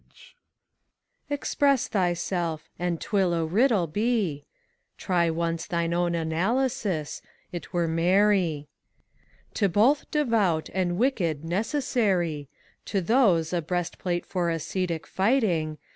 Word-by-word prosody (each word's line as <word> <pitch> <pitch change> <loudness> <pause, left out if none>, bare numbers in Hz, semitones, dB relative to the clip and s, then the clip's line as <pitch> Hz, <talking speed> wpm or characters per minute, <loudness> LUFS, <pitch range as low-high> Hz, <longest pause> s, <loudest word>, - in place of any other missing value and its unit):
SPHINX. - - -19 1.0
Express 280 -2 +1
thyself, 175 -4 -1
and 175 -2 -1
't - - -9
will 190 -4 +2
a 165 -1 0
riddle 210 +2 +2
be. 195 -4 -1 0.5
Try 175 -2 +1
once 165 0 -2
thine 170 -2 -1
own 175 0 +1
analysis: 180 - -1 0.3
't 175 - -6
were 170 -1 0
merry. 175 -2 +2 0.9
"To 200 -3 +1
both 230 - +3
Devout 220 - +1
and 180 -2 0
Wicked 175 - 0
necessary: 185 - 0 0.4
To 200 - -1
those, 185 -6 +2
a 175 - +1
breast 175 +1 -3
plate 175 -1 -2
for 175 -2 -1
ascetic 165 +1 -2
fighting; 190 - +1
ACT 150 - -16
II. - - -40
175 Hz, 125 wpm, -26 LUFS, 165-210 Hz, 1.0 s, both